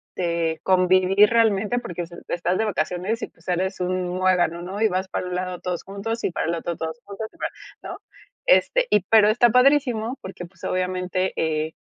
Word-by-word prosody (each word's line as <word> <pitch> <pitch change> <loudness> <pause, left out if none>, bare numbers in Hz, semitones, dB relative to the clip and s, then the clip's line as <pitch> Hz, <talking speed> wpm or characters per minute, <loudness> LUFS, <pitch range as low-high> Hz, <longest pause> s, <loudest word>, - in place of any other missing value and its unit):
de 170 -2 -1
convivir 185 +2 +4
realmente, 225 0 +2
porque 175 -7 -6
es 170 0 -7 0.2
estás 175 +1 -1
de 220 - +1
vacaciones 185 +3 -2
y - - -3
pues 165 - -26
sales 185 +2 -1
un 180 0 -1
muégano, 180 -2 +1
¿no? 190 +4 -6
Y 220 - +4
vas 185 +1 -2
para 185 - -4
un 180 - -4
lado 180 -1 -3
todos 180 -2 -3
juntos, 215 +4 -4
y - - 0
para - - -2
el 170 - 0
otro 170 +1 -4
todos 160 +8 -5
juntos, 200 +2 -6
y 335 - -21
para - - -2 0.3
¿no? - - -7 0.5
Este, - - +4
y 210 - +4
pero 215 -2 +6
está 240 +2 +4
padrísimo 250 -2 +3
porque 190 -1 -8
pues 170 0 -20
obviamente, 185 0 -1
eh, 155 0 -1
185 Hz, 195 wpm, -23 LUFS, 175-215 Hz, 0.5 s, pero